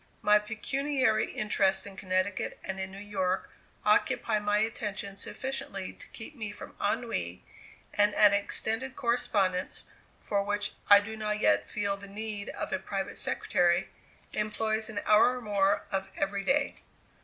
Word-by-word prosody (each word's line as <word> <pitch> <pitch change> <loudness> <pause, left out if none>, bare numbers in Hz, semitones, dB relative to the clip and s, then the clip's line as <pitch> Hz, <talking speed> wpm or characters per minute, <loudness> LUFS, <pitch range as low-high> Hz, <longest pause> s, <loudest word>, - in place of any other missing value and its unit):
My 210 0 +6
pecuniary 255 +3 0
interests 195 -2 +1
in 200 -1 -8
Connecticut 185 0 -1
and 190 0 -4
in 190 0 -3
New 195 - -10
York 195 -2 -2 0.3
occupy 215 - +3
my 205 0 +1
attention 210 -2 -2
sufficiently 265 -2 -4
to - - -12
keep 260 +7 -9
me 215 -5 -4
from 210 - -10
ennui, 200 - -1 0.5
and 205 0 +3
an 205 -1 +7
extended 225 +5 -1
correspondence 200 -7 0 0.4
for 200 -1 0
which 205 +1 -1 0.2
I 200 0 +10
do 220 +2 -6
not 210 -1 -1
yet 100 - +3
feel 200 -1 -1
the 200 0 -10
need 210 0 -5
of - - -4
a - - +1
private 195 0 -4
secretary 175 -3 +1 0.4
employs 220 +1 -1
an 210 -2 -3
hour 215 +4 +5
or - - -6
more 200 -2 +2
of 195 -1 -2
every 195 0 -1
day. 275 +5 +1
205 Hz, 150 wpm, -30 LUFS, 195-220 Hz, 0.5 s, I